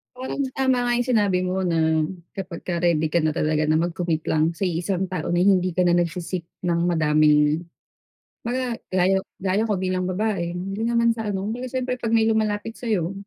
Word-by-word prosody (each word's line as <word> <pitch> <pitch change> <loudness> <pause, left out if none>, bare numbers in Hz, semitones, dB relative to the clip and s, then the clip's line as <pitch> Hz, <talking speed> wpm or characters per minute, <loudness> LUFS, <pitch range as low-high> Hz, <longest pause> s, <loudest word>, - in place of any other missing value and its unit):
Parang 260 +2 -4 0.2
tama 260 -1 +2
nga 240 0 +1
yung 245 +1 -1
sinabi 205 -6 +3
mo 185 +1 -1
na 160 -2 +2 0.3
kapagka 175 -2 -4
ready 165 -3 +2
ka 170 +2 +2
na 155 0 +1
talaga 155 0 +1
na 155 - +4
mag-commit 170 -1 -1
lang 160 +1 +2
sa 195 - -1
iisang 180 +2 -1
tao 180 -3 -4
na 175 - +1
hindi 185 -1 +4
ka 180 - +2
na 175 - +4
nagse-seek 175 0 -2 0.2
ng 170 -1 +1
madaming 150 -1 +3 0.8
mga 245 0 -2
gaya 185 +1 +3 0.2
gaya 195 +3 +1
ko 205 - +1
bilang 185 0 -1
babae 185 -3 -1
hindi 195 +4 -4
naman 235 0 +2
sa 225 -2 -4
ano 195 -1 -2
kung 215 - -2
baga 250 +2 -5
syempre 255 0 -2
pag 235 -2 -3
may 225 -1 +4
lumalapit 220 0 0
sa'yo, 200 -8 -2
185 Hz, 190 wpm, -23 LUFS, 170-220 Hz, 0.8 s, na